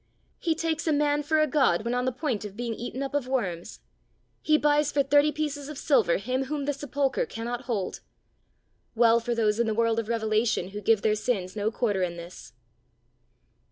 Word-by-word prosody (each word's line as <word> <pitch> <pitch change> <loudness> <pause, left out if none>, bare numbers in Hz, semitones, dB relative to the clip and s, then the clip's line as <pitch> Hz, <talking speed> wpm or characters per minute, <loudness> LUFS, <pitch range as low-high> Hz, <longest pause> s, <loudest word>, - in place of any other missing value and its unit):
He 330 -3 0
takes 325 0 -2
a - - +3
man 295 0 +2
for 310 +2 +1
a 310 - +5
God 255 - +2
when 235 - -1
on 250 0 0
the 255 - +1
point 255 -5 -2
of 205 -2 -8
being 240 -1 -3
eaten 245 +4 -5
up 275 - -5
of 290 -3 -1
worms! 190 -10 -3 0.6
he 305 0 +3
buys 295 0 +2
for 280 - +2
thirty 290 +2 +4
pieces 295 -2 -3
of 300 - -7
silver 270 - +3
him 255 +6 -2
whom 290 0 -3
the 290 - 0
sepulchre 285 - -1
cannot 240 +2 -5
hold! 210 -7 -2 1.0
Well 230 0 +5
for 235 +1 -2
those 215 -1 +1
in 235 - +2
the 220 - 0
world 230 0 +2
of 225 - -4
revelation, 220 -4 0
who 205 +1 -7
give 220 0 +2
their 215 - +3
sins 210 -4 -2
no 210 0 0
quarter 215 -4 -1
in 175 -1 -2
this! 170 +1 -10
245 Hz, 200 wpm, -27 LUFS, 215-290 Hz, 1.0 s, a